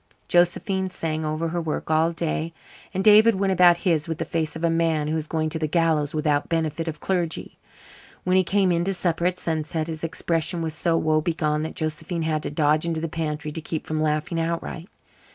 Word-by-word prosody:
Josephine 185 +2 +2
sang 160 -3 -3
over 155 +2 -1
her 170 +1 -2
work 160 -1 -3
all 160 +1 +3
day, 165 0 -2 0.4
and 190 - -2
David 215 +1 +7
went 195 0 +1
about 175 -1 +6
his 160 -4 +2
with 160 -2 -3
the 165 - -3
face 160 -1 -2
of 160 - -6
a 170 - +3
man 165 -2 +1
who 155 - -1
is 155 -1 -3
going 155 0 -1
to 160 +1 -4
the 155 - 0
gallows 155 -2 +1
without 150 -1 +1
benefit 165 -1 -1
of 160 - -4
clergy. 175 -4 -2 0.6
When 180 0 +2
he 185 - +5
came 190 0 +2
in 170 0 +1
to 195 0 0
supper 175 -1 0
at 180 0 -1
sunset 160 -1 -2
his 160 -1 -6
expression 165 +1 -1
was 160 -1 -2
so 165 +2 +1
woe 155 -1 +2
begone 155 -2 0
that 160 - -5
Josephine 160 +2 -3
had 155 -1 0
to - - -4
dodge 150 +1 +2
into 165 -1 -1
the 165 - -2
pantry 150 -1 -3
to 160 - -5
keep 155 0 -4
from 155 0 -2
laughing 155 +2 0
outright. 170 +1 -3
165 Hz, 215 wpm, -24 LUFS, 155-170 Hz, 0.6 s, David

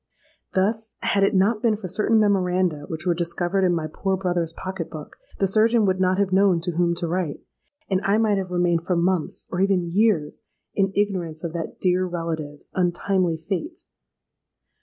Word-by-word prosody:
Thus, 220 +4 0
had 200 -1 +2
it 195 - +2
not 210 +3 +2
been 225 -2 +3
for 205 -3 -6
certain 215 +4 +2
memoranda 180 -6 +1
which 160 +1 -5
were 175 - +3
discovered 175 +3 0
in 180 -1 +3
my 160 -2 -2
poor 190 +5 -2
brother's 175 -3 -1
pocket 185 0 -6
book, 155 -2 -9 0.2
the 195 - +2
surgeon 220 +3 +3
would 185 -1 +1
not 185 0 +2
have 195 -2 +1
known 190 -2 +4
to 175 +1 -2
whom 170 0 +1
to 170 0 -1
write, 170 -3 -2 0.5
and 190 -1 0
I 200 +2 +2
might 215 -3 +2
have 185 -1 -4
remained 175 -2 +1
for 180 0 0
months—or 175 +1 -1
even 195 -2 +2
years—in 195 0 0
ignorance 180 -6 -1
of 165 -2 -4
that 170 -1 -5
dear 185 0 +2
relative's 160 -4 -5
untimely 180 -1 +1
fate. 205 - -5
185 Hz, 175 wpm, -23 LUFS, 170-195 Hz, 0.5 s, known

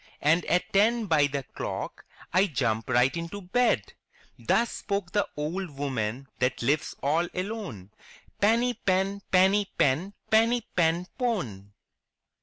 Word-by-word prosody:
And 165 +4 +4
at 180 - 0
ten 220 +3 +3
by 155 -6 +3
the 140 -1 -3
clock - - -6 0.3
I 190 +3 +4
jump 115 - -1
right 125 +3 +3
into 170 +4 -5
bed!'' 220 +7 +1 0.5
Thus 235 0 +1
spoke 200 -2 -3
the 205 0 +1
old 170 +5 -3
woman 130 -2 -2
that 125 -1 0
lives 140 +5 0
all 160 +5 +2
alone, 185 - -5 0.5
Peeny 235 +4 +3
Pen, 195 +1 +1
Peeny 195 +2 +4
Pen, 155 +9 +1 0.2
Peeny 230 +2 +4
Pen 170 0 +2
Pone 115 - -2
180 Hz, 130 wpm, -27 LUFS, 140-205 Hz, 0.5 s, And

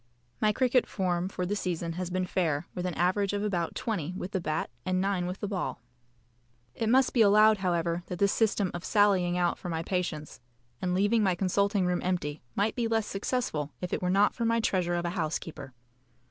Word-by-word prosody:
My 215 - +4
cricket 250 +2 +2
form 180 -2 -1
for 185 -2 -3
the 200 +3 -1
season 170 -4 -2
has 180 +1 -4
been 185 0 -1
fair, 170 -4 0
with 180 0 -3
an 175 - -4
average 185 +4 +1
of 205 0 -1
about 175 -5 -1
20 185 -6 -3
with 185 - -5
the 190 - -1
bat 155 -4 -2
and 185 0 0
9 190 -2 0
with 185 +2 -5
the 205 - -1
ball. 185 -10 -3 0.9
It 225 - -1
must 260 +2 +4
be 240 - +4
allowed, 215 0 +6
however, 170 -2 0
that 180 - -5
this 200 +2 +3
system 205 -4 +1
of 175 - -5
sallying 190 -4 +3
out 175 -1 +1
for 180 - -6
my 165 -1 -2
patients 165 -7 -3 0.4
and 180 0 0
leaving 205 +4 +3
my 190 -3 +2
consulting 200 +1 +1
room 180 0 0
empty 165 -5 -2
might 210 +2 +1
be 235 -2 0
less 225 -1 +1
successful 195 - -2
if 180 - -4
it - - -1
were 180 - 0
not 200 +3 +4
for 235 - -3
my 230 0 +2
treasure 180 -5 +1
of 175 0 -1
a 170 - -1
housekeeper. 160 -4 -4
185 Hz, 210 wpm, -29 LUFS, 175-205 Hz, 0.9 s, allowed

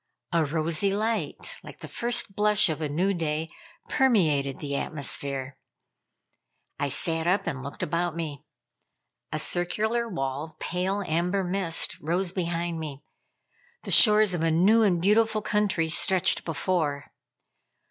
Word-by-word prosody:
A 170 -1 +2
rosy 160 +5 +1
light, 220 +3 -2
like - - -13
the - - -7
first 235 -4 -2
blush 210 -2 +4
of 155 0 -3
a 150 - -2
new 180 +7 0
day, 160 -2 -3 0.4
permeated 160 - +2
the 140 -2 -4
atmosphere. 140 -2 -2 1.2
I 145 - -1
sat 165 +3 0
up 185 +3 +2
and 140 -6 -3
looked 140 +2 -7
about 170 +1 -1
me. 155 -5 -5 0.9
A - - -2
circular 220 +7 -1
wall 135 -6 -3
of 160 - -17
pale 190 +3 -2
amber 180 +4 0
mist 180 -2 0
rose 175 +4 -1
behind 170 -2 -2
me; 145 -3 -7 0.8
the - - -5
shores 210 -3 +7
of 175 - -2
a 165 - +2
new 190 +8 +4
and 190 -5 +3
beautiful 215 +3 +2
country 205 -6 0
stretched 180 +3 +2
before. 155 -3 -2
170 Hz, 135 wpm, -26 LUFS, 155-200 Hz, 1.2 s, shores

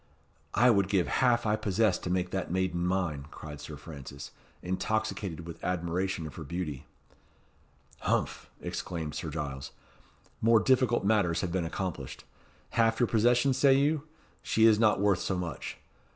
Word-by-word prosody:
"I 120 +3 +6
would 100 -4 +3
give 95 -4 +2
half 120 -2 +3
I 105 0 +3
possess 110 0 +1
to - - -5
make 90 0 0
that 95 - -2
maiden 90 -1 0
mine," 85 -7 -1
cried 75 -2 -9
Sir 75 0 -8
Francis, 70 -2 -9 0.3
intoxicated 95 -2 -2
with 85 -1 -9
admiration 90 0 -1
of 75 - -7
her 80 - -5
beauty. 75 -3 -5 1.1
"Humph!" - - -1
exclaimed 80 -4 -4
Sir - - -4
Giles. 70 -2 -4 0.7
"More 115 0 +6
difficult 120 -2 +2
matters 95 -6 +2
have 95 - -2
been 90 -1 0
accomplished. 90 +1 -4 0.5
Half 115 -1 +2
your 120 - +5
possessions, 120 +4 +3
say 135 -2 +6
you? 145 +2 +1 0.3
She 110 - +3
is 110 -2 +6
not 110 -3 +4
worth 100 -3 +3
so 95 - -1
much. 90 -2 -5
95 Hz, 150 wpm, -30 LUFS, 85-110 Hz, 1.1 s, I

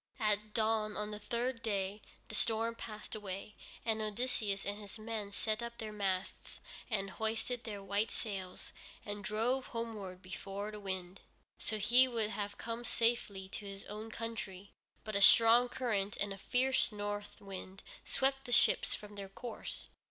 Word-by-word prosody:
At 210 -1 +1
dawn 215 -1 +2
on 210 0 -1
the 210 - -4
third 235 +3 -1
day, 200 -1 -1 0.3
the - - -7
storm 225 +1 +2
passed 215 -2 -7
away, 205 0 -4 0.3
and 220 -1 +2
Odysseus 215 -2 -1
and 205 +1 -2
his 205 0 -8
men 215 -2 -4
set 215 +2 -1
up 235 0 -5
their 220 -1 -4
masts 195 -2 -2 0.3
and 195 -4 0
hoisted 225 +3 -1
their 205 -3 -4
white 200 +3 +1
sails, 190 -4 -4 0.3
and 205 0 -4
drove 230 +6 +1
homeward 210 -5 -4
before 195 +3 -4
the 210 - -7
wind. 190 -2 -4 0.4
So 215 - 0
he 240 +5 +7
would 225 -4 0
have 205 -1 -3
come 230 +1 -3
safely 230 -5 +1
to 205 - -5
his 195 0 -6
own 215 +2 -6
country, 215 -4 -4 0.3
but 215 -1 -4
a 200 - +3
strong 230 +4 +8
current 210 -6 0
and 200 -1 0
a - - -7
fierce 260 +3 +3
north 205 0 -3
wind 195 -1 -7 0.2
swept 270 0 +2
the 245 - -4
ships 240 - +5
from 210 0 -9
their 200 -1 -6
course. 230 +3 -6
215 Hz, 165 wpm, -35 LUFS, 200-230 Hz, 0.4 s, strong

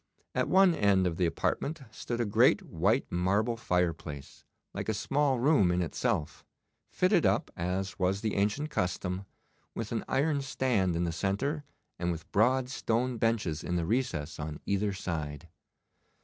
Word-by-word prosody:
At - - 0
one 190 -1 +6
end 100 - +3
of 85 -2 -1
the 90 - +2
apartment 140 - -2
stood 120 +2 -4
a 120 - +1
great 100 - +4
white 100 +11 +1
marble 100 +7 +1
fireplace, 80 -9 -2 0.3
like - - -4
a 110 - 0
small 135 +4 +1
room 120 - +4
in 90 0 +1
itself, 75 -2 -2 0.5
fitted - - +2
up, - - +1
as 95 +2 -3
was 95 +2 +1
the 110 -2 -1
ancient 105 +10 0
custom, 90 -4 -2 0.5
with - - -4
an - - -1
iron 145 +1 +1
stand 125 -9 0
in 85 - 0
the 85 - 0
centre, 105 - -1 0.3
and 85 0 0
with 80 -2 -7
broad 125 +5 +3
stone 125 -2 -1
benches 105 -10 0
in 90 - -2
the 85 -2 0
recess 85 - -1
on 75 0 -5
either 100 +1 0
side. 80 -5 -4
100 Hz, 160 wpm, -30 LUFS, 85-125 Hz, 0.5 s, one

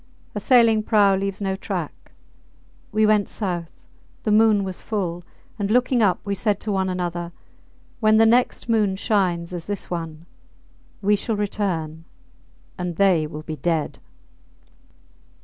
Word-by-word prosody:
A 210 - -3
sailing 230 -1 +4
prau 205 -2 +4
leaves 195 +1 -3
no 190 -1 -1
track. 190 - -6 0.8
We 215 +1 +3
went 210 -1 +3
south. 175 -5 -3 0.5
The 215 - 0
moon 215 -1 +4
was 190 -1 -5
full; 175 -5 -3 0.4
and, 200 -1 -1
looking 250 +1 +2
up, 195 -4 +3
we 200 - -1
said 205 +1 0
to 215 - -3
one 190 -1 0
another, 175 -1 -3 0.7
When 215 -1 +4
the 225 - +6
next 245 +3 +2
moon 215 -4 +2
shines 180 -4 0
as 170 -2 -6
this 205 -3 -5
one, 165 -2 -5 0.8
we 205 +1 +4
shall 220 +2 -2
return 170 -6 -3 0.7
and 180 -1 -3
they 180 -5 +3
will 150 0 -8
be 155 0 -6
dead. 160 +1 -1
195 Hz, 145 wpm, -23 LUFS, 175-215 Hz, 0.8 s, the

